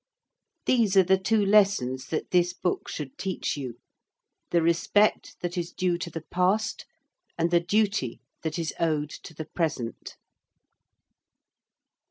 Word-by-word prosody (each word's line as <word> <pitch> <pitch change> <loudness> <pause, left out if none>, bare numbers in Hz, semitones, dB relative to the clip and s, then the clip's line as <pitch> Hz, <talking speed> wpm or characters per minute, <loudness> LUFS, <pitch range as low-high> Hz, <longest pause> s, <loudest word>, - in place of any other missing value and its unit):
These 220 -6 +3
are 190 - +8
the 190 +1 +3
two 210 +2 +2
lessons 195 -11 +3
that 155 - -3
this 180 0 +3
book 180 0 -2
should 145 -4 -6
teach 190 -1 -2
you 130 -5 -6 0.7
the 170 -1 +2
respect 170 +5 +2
that 175 0 -2
is 170 0 -4
due 180 -1 0
to 170 - -4
the 165 -1 -6
past 195 +5 +1 0.5
and 170 0 +1
the 175 - +5
duty 195 - 0 0.2
that 160 0 -3
is 165 -2 -2
owed 155 -3 0
to 160 - -10
the 155 - -5
present. 140 -11 -3
175 Hz, 140 wpm, -27 LUFS, 155-195 Hz, 0.7 s, are